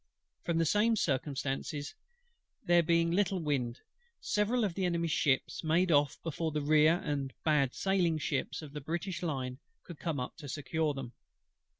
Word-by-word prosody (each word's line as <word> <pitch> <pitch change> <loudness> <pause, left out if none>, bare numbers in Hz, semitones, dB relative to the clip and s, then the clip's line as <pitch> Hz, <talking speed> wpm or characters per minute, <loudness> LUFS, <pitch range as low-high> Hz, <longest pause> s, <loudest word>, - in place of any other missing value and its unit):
From 170 -1 0
the 165 - +3
same 210 +7 +3
circumstance 140 - -1
of 145 +4 -5 0.7
there 175 0 +5
being 170 0 +2
but 175 - +1
little 200 -1 +2
wind, 135 -7 -1 0.4
several 220 +4 +1
of 200 -5 0
the 190 - -2
Enemy's 170 -2 0
ships 140 +1 +1
made 170 +3 +2
off 145 -2 +3
before 165 0 -2
the 150 - -1
rear 155 +3 +5
and 140 -2 -2
bad 150 -5 +2
sailing 185 -4 +1
ships 145 +1 -2
of 145 -2 -10
the 150 - -5
British 170 +6 -3
lines 130 -6 -3 0.2
could 170 -4 -10
come 160 -5 -2
up 125 - -5
to 145 -4 -8
secure 145 +2 -1
them. 130 -3 -6
155 Hz, 175 wpm, -32 LUFS, 140-175 Hz, 0.7 s, there